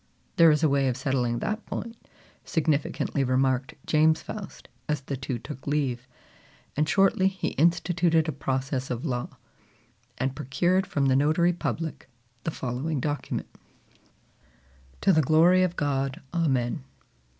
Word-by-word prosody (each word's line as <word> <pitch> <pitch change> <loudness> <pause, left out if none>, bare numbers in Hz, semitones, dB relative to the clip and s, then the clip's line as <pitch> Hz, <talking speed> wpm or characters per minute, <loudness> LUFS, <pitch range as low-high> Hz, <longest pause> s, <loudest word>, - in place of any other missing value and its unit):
"There 165 -1 +8
is 150 +1 +2
a - - +6
way 140 -1 +2
of 125 -1 -1
settling 125 -3 0
that 215 - -3
point," 230 0 -5 0.5
significantly 150 -3 0
remarked 130 +1 +1
James 155 +1 +3
Faust, 210 -4 -8 0.2
as 150 -2 0
the 140 0 -4
two 130 -1 -4
took 120 +4 -9
leave; 130 -4 -1 0.7
and 150 +1 +1
shortly 195 -1 +4
he 190 -2 -2
instituted 170 0 +2
a - - 0
process 135 -1 -2
of 125 +2 -3
law, 125 -4 -3 0.8
and 135 +1 -1
procured 175 +7 +1
from 140 -2 0
the 130 -1 +3
notary 155 +5 +3
public 165 -4 -4 0.4
the - - +1
following 135 +2 -3
document: 145 0 -3 1.5
"To 195 - +4
the 155 - +5
glory 165 +6 +5
of 180 -1 +1
God, 135 -3 -1
Amen. 130 -8 0
145 Hz, 140 wpm, -26 LUFS, 130-165 Hz, 1.5 s, There